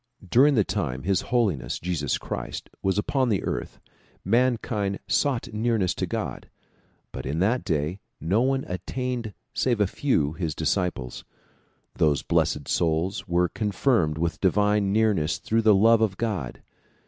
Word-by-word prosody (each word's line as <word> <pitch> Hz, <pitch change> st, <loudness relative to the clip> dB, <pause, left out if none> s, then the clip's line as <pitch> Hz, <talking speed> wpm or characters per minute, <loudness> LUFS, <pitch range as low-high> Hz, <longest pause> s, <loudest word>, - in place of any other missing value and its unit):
During 135 Hz, +9 st, +5 dB
the 105 Hz, -, +4 dB
time 65 Hz, -7 st, -3 dB
His 95 Hz, +3 st, +1 dB
Holiness 95 Hz, -, 0 dB
Jesus 80 Hz, -6 st, -1 dB
Christ -, -, -6 dB
was 95 Hz, +1 st, 0 dB
upon 130 Hz, +4 st, +1 dB
the 100 Hz, -4 st, 0 dB
earth -, -, -4 dB, 0.5 s
mankind 110 Hz, -3 st, +1 dB
sought 130 Hz, -5 st, 0 dB
nearness 110 Hz, -4 st, +1 dB
to -, -, -3 dB
God, -, -, -4 dB, 0.6 s
but -, -, -6 dB
in 70 Hz, +4 st, -2 dB
that 110 Hz, +8 st, +1 dB
day 80 Hz, +1 st, -1 dB, 0.2 s
no 95 Hz, +9 st, +1 dB
one 135 Hz, +1 st, +1 dB
attained 120 Hz, +3 st, -4 dB, 0.2 s
save 120 Hz, -4 st, +1 dB
a 105 Hz, -, +4 dB
very 95 Hz, -, -8 dB
few, 80 Hz, -, +1 dB
his 80 Hz, -2 st, -3 dB
disciples. 80 Hz, -6 st, -2 dB, 0.7 s
Those 75 Hz, -3 st, +2 dB
blessed 70 Hz, -2 st, 0 dB
souls 85 Hz, +3 st, 0 dB
were 90 Hz, +1 st, +2 dB
confirmed 100 Hz, -, 0 dB
with 85 Hz, +1 st, -1 dB
divine 105 Hz, +1 st, +2 dB
nearness 105 Hz, -7 st, +2 dB
through 115 Hz, +1 st, 0 dB
the 110 Hz, -2 st, +5 dB
love 115 Hz, +3 st, +5 dB
of 100 Hz, -4 st, +1 dB
God. 100 Hz, -, -3 dB
100 Hz, 150 wpm, -25 LUFS, 85-115 Hz, 0.7 s, During